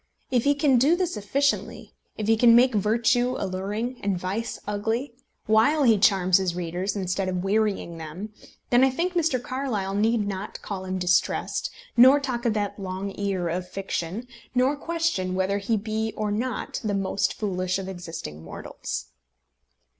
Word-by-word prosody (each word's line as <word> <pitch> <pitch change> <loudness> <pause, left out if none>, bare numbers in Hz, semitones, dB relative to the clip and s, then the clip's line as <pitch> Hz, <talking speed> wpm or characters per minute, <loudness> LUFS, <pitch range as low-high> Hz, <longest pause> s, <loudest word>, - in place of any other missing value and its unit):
If 245 -1 +2
he 285 0 +4
can 280 -3 +3
do 290 +7 +4
this 355 -4 -1
efficiently, 275 +8 -1 0.2
if 215 - -2
he 225 +1 +4
can 230 +1 +6
make 250 +1 +5
virtue 235 +4 +2
alluring 205 +6 -3
and 200 -2 0
vice 195 +6 -3
ugly, 225 +5 -2 0.3
while 230 +8 +4
he 225 -5 +5
charms 185 -2 +4
his 180 -2 -1
readers 180 +3 -2
instead 190 -1 -1
of 180 -1 -2
wearying 195 -4 0
them, 175 +7 -7 0.4
then 245 +1 +6
I 265 - +6
think 340 +8 -1
Mr. 320 -7 +1
Carlyle 245 -7 -3
need 215 +1 +2
not 195 0 -5
call 190 -2 -5
him 185 0 -2
distressed, 180 -1 +1 0.3
nor 260 +4 +8
talk 255 -3 -3
of 220 - +1
that 205 -1 -2
long 190 +1 -4
ear 195 -3 -1
of 180 +2 -3
fiction, 195 +3 -4 0.3
nor 255 +3 +3
question 320 - -1
whether 190 +2 0
he 220 +3 0
be 220 +1 -2
or 215 -1 -1
not 235 +3 -3
the 210 -2 0
most 195 0 0
foolish 185 -3 -1
of 195 -1 -5
existing 165 - -7
mortals. 80 -5 -6
210 Hz, 165 wpm, -25 LUFS, 190-245 Hz, 0.4 s, nor